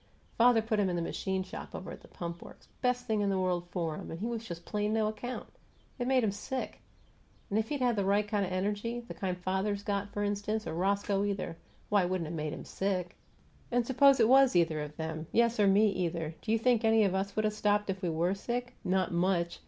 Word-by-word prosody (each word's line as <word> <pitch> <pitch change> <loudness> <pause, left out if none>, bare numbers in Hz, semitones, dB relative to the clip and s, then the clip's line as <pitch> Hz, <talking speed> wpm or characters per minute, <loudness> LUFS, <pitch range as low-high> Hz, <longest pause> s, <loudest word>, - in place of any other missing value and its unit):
Father 235 -1 +5
put 220 -1 0
him 195 -2 +2
in 175 - -1
the 170 - -1
machine 190 +2 -2
shop 185 - -8
over - - -6
at - - -9
the - - -15
Pump 170 0 -6
Works - - -13
best 250 0 +1
thing 220 -3 0
in 200 - +1
the 195 - +1
world 180 -2 0
for 165 -4 -2
him - - -8
and 165 - -6
he 210 - -3
was 230 -1 -3
just 170 -5 -8
plain 210 0 -1
no 220 -1 +2
account. 220 +4 -5 0.5
It 245 - -1
made 260 -2 +3
him 210 - +2
sick! 255 +6 -5 0.7
If 220 +2 +1
he'd 290 -3 -2
had 245 -2 +3
the 200 - +1
right 200 +2 +2
kind 205 -1 0
of 185 - -3
energy 205 +5 -1
the 235 - -9
kind 185 -2 -3
father's 190 +3 -1
got, 200 0 -2
for 205 - -2
instance, 205 +2 -1
or 160 - -4
Roscoe, 200 +3 +1
either 200 -4 -2 0.3
why, 205 -1 +4
it 180 - 0
wouldn't 185 -2 -1
have 165 - -4
made 155 -1 -2
him - - -7
sick. 185 -3 -2 0.6
And 245 -1 +2
suppose 275 +2 +5
it - - +6
was 265 -2 +6
either 165 -3 +3
of 150 0 -7
them 160 -1 -4
yes, 235 -1 +3
or 205 - +5
me, 205 +2 +5
either 165 -3 -2
do 220 - -3
you 225 - +4
think 235 0 +2
any 225 -1 +5
of 195 -2 +2
us 195 +1 -2
would 215 - +1
have 215 - +1
stopped 210 -1 +1
if 190 0 -6
we 180 - 0
WERE 170 +3 +1
sick? 245 +5 -3
Not 185 -1 +1
much! 170 0 +1
200 Hz, 245 wpm, -31 LUFS, 180-220 Hz, 0.7 s, it